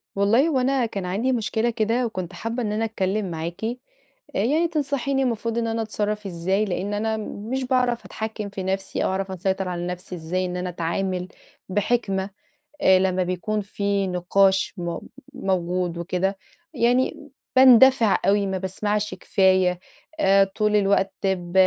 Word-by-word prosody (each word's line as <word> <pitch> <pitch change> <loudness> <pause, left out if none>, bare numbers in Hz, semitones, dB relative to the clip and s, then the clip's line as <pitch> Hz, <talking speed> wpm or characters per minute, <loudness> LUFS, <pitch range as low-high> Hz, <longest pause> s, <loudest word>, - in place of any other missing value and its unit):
والله، 225 +9 +3
هو 280 -5 +1
أنا 260 0 +2
كان 200 -4 -4
عندي 205 +9 0
مشكلة 230 -1 0
كده 230 +2 0
وكنت 185 -6 -5
حابّة 230 +2 -3
إن 210 - -1
أنا 220 +2 0
أتكلّم 195 -3 -1
معاكِ 165 +4 -5 0.7
آآ - - +1
يعني 300 +10 +2
تنصَحيني 280 -3 -1
المفروض 230 -2 -1
إن 230 -1 0
أنا 225 0 -1
أتصرّف 210 -1 -2
إزاي 190 +3 0
لأن 195 +1 -3
أنا 220 +1 -1
م 215 0 -7
مش 265 0 -1
باعرَف 250 -2 +1
أتحكّم 220 -1 -5
في 195 -1 -6
نفْسي 190 +1 -2
أو - - +1
أعرَف 190 0 -2
أسيطر 190 +1 -1
على 175 -1 -3
نفْسي 180 +1 -6
إزاي 180 +3 -2
إن 180 0 -3
أنا 180 0 -3
أتعامل 180 +2 -2 0.4
بحِكمة 200 -1 0 0.5
آآ 190 0 +6
لمّا 185 0 +1
بيكُون 185 +4 -2
في 200 -1 -1
نِقاش 190 +2 +2
مو 170 -2 -4 0.3
موجود 180 -4 -1
وكده، 185 +3 -1 0.4
يعني 245 +1 +1 0.3
باندَفِع 260 -3 +7
أوي، 200 +1 +3
ما 190 -1 -2
باسمَعش 205 +3 -2
كفاية 185 -2 +2 0.4
آآ، 195 -5 +5
طول 210 +2 0
الوقت 195 -1 +2
ب 180 -3 -1
200 Hz, 160 wpm, -24 LUFS, 185-225 Hz, 0.7 s, باندَفِع